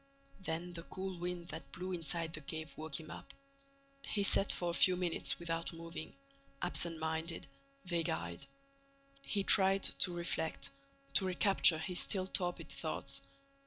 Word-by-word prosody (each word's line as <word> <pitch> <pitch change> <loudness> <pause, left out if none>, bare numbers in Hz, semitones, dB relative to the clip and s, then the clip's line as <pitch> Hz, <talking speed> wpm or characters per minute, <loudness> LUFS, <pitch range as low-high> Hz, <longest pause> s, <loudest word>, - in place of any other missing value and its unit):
Then 175 -1 -4
the 170 - -5
cool 190 +1 -6
wind 175 0 -4
that 160 - -8
blew 185 +1 -5
inside 165 -1 0
the 155 - -5
cave 160 +2 -5
woke 155 -1 -3
him 155 -1 -10
up. - - -10 0.7
He 205 -6 -1
sat 200 0 +5
for 175 -1 -1
a - - -5
few 185 +1 +5
minutes 175 -2 +1
without 165 -1 -3
moving, 165 -2 -8 0.4
absent 170 -1 +4
minded, 160 +1 -2 0.4
vague 170 -2 0
eyed. 85 +1 -4 0.8
He 205 -7 -1
tried 195 0 +6
to 180 - +3
reflect, 170 -2 -2 0.4
to 145 - +7
recapture 185 -2 +5
his 175 +3 -1
still 190 -3 +1
torpid 180 -1 0
thoughts. - - -3
170 Hz, 150 wpm, -35 LUFS, 160-185 Hz, 0.8 s, to